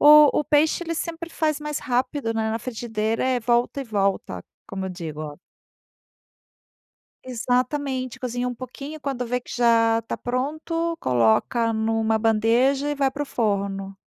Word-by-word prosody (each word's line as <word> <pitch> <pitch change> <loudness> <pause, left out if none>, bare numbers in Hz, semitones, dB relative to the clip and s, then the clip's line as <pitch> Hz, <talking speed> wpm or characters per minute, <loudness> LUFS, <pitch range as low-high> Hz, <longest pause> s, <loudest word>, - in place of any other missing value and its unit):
o 300 0 +8
o - - -3
peixe, 310 +3 +3
ele 335 0 -3
sempre 335 0 -4
faz 305 -2 0
mais 300 -1 -3
rápido, 255 -2 -1
né, 220 0 0
na 225 - -1
frigideira. 225 -1 -2
É 260 -1 +2
volta 240 +4 +1
e - - -4
volta, 200 -3 -1 0.2
como 190 -1 -5
eu - - -3
digo 160 -4 -6
o 150 +1 -7 1.8
Exatamente, 255 +1 -1
cozinha 250 0 -2
um 245 - -4
pouquinho 275 +5 -8
e - - -13
quando 265 -4 -3
vê 250 +1 -1
que - - -9
já 230 -2 +4
está 230 - -4
pronto, 315 +7 -2
coloca 125 - +2
numa 220 0 +1
bandeja 235 +6 +2
e 295 - 0
vai 275 -1 +1
para 290 +2 -4
o - - -18
forno. 195 -4 -1
245 Hz, 160 wpm, -24 LUFS, 220-280 Hz, 1.8 s, o